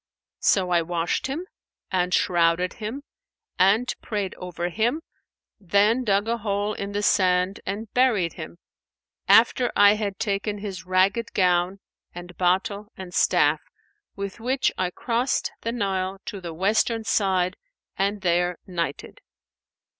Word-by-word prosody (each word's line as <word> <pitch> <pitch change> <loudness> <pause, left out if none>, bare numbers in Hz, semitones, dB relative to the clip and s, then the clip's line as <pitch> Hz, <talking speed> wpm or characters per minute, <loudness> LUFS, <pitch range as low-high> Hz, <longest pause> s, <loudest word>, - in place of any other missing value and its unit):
So 185 -2 +2
I 170 -1 +4
washed 170 +4 -1
him 300 +7 -4 0.5
and 180 -1 +1
shrouded 175 0 +2
him 235 +7 -5 0.6
and 215 +7 +3
prayed 205 -3 -3
over 175 -1 -4
him, 240 - 0 0.6
then 205 +6 +2
dug 205 -1 +1
a 235 0 -1
hole 205 0 -1
in 200 0 -5
the 205 0 -1
sand 185 0 +2
and 210 +3 -3
buried 220 -10 +2
him, 165 0 -9 0.7
after 240 +2 +5
I 205 0 +7
had 205 -2 -3
taken 205 0 -2
his 190 -3 -7
ragged 195 +5 +1
gown 180 +1 +1 0.3
and 175 0 -9
bottle 190 +4 0
and 185 -2 -8
staff, - - +3 0.5
with 200 +2 -6
which 255 +4 +1
I 185 -1 -1
crossed 240 +7 -1
the 230 - -2
Nile 195 -4 -2
to 200 - -6
the 170 -2 -6
western 215 +6 +1
side 190 -3 +1 0.4
and 200 +1 -1
there 175 -1 +1
nighted. 170 -6 -4
195 Hz, 135 wpm, -24 LUFS, 180-215 Hz, 0.7 s, I